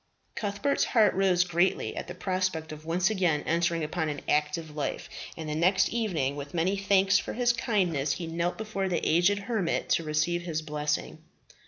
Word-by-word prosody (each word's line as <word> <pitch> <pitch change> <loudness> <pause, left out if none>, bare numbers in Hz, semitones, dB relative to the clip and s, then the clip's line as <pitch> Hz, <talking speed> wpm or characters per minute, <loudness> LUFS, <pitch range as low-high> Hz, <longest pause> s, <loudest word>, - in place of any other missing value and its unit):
Cuthbert's 210 +7 0
heart 220 -3 +4
rose 185 -2 +3
greatly 175 +1 0
at - - -5
the 180 - -7
prospect 185 -4 -2
of 155 +1 -10
once 180 +4 +2
again 180 -7 +1
entering 170 0 +1
upon 155 +1 -2
an 145 -1 -4
active 150 +1 0
life, 150 - -3 0.3
and 160 -1 -6
the 150 - -2
next 180 +5 +3
evening, 175 - -1
with 145 +2 -7
many 175 +4 +1
thanks 195 -1 +3
for - - -5
his 240 0 +2
kindness, 185 - 0
he 175 - -5
knelt 170 +2 -2
before 210 -3 -3
the 175 - -1
aged 175 +5 +3
hermit 200 -4 -1
to 165 - +2
receive 155 +3 0
his 160 -2 -3
blessing. 150 0 -2
175 Hz, 180 wpm, -28 LUFS, 155-195 Hz, 0.3 s, heart